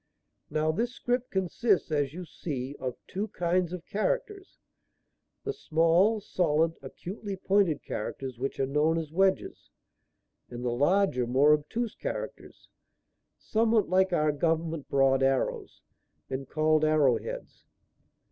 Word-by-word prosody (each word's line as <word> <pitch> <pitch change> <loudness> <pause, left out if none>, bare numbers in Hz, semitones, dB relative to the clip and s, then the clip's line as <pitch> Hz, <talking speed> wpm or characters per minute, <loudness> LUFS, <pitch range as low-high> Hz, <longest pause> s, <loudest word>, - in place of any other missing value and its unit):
Now 155 0 +1
this 235 +9 -2
script 245 0 -1
consists, 190 +1 +1
as 145 -3 +1
you 180 +3 -7
see, 140 -5 -5
of 130 -2 -3
two 200 +3 -3
kinds 175 -2 0
of 180 -2 -6
characters; 390 - -2 0.9
the 420 - -2
small, 170 - +3
solid, 165 -4 +1
acutely 195 +9 -6
pointed 190 -5 +1
characters 125 +3 -5
which 135 +2 -3
are 135 - +2
known 150 +4 +2
as 160 -2 -4
wedges, 190 +3 0 0.8
and 120 0 -6
the 120 - +1
larger, 145 -1 +2
more 140 +5 +5
obtuse 215 +10 -1
characters, - - -6 0.7
somewhat 225 -1 +1
like 190 +1 +3
our 155 -3 +2
government 160 0 -1
broad 135 -1 +3
arrows, 135 0 -1 0.5
and 130 0 -4
called 155 0 +2
arrow 155 -5 +4
heads. - - -8
165 Hz, 130 wpm, -28 LUFS, 140-195 Hz, 0.9 s, more